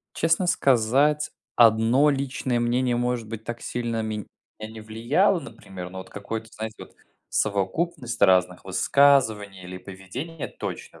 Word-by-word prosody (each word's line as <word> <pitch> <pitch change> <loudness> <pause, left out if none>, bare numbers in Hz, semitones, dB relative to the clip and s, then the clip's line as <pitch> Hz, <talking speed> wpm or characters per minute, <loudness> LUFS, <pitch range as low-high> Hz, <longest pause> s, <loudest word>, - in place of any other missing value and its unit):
Честно 165 +3 +2
сказать, 140 +2 +2 0.2
1 115 +5 +5
личное 135 -3 -1
мнение 120 +1 +1
может 120 -2 -1
быть 110 -1 -6
так 120 +1 -6
сильно 115 -2 -3
мен 110 -2 -4 0.3
не 110 +1 -7
влияло, 120 - +1
например. 90 - -9
Но 95 - -8
вот 95 0 -8
какое-то, 110 +3 -6
знаете, 110 0 -6
вот - - -12 0.4
совокупность 120 - -1
разных 90 -2 +4
высказываний 105 -3 +3
или 90 +1 -7
поведения 95 - -7
точно - - -7
115 Hz, 130 wpm, -25 LUFS, 100-135 Hz, 0.4 s, 1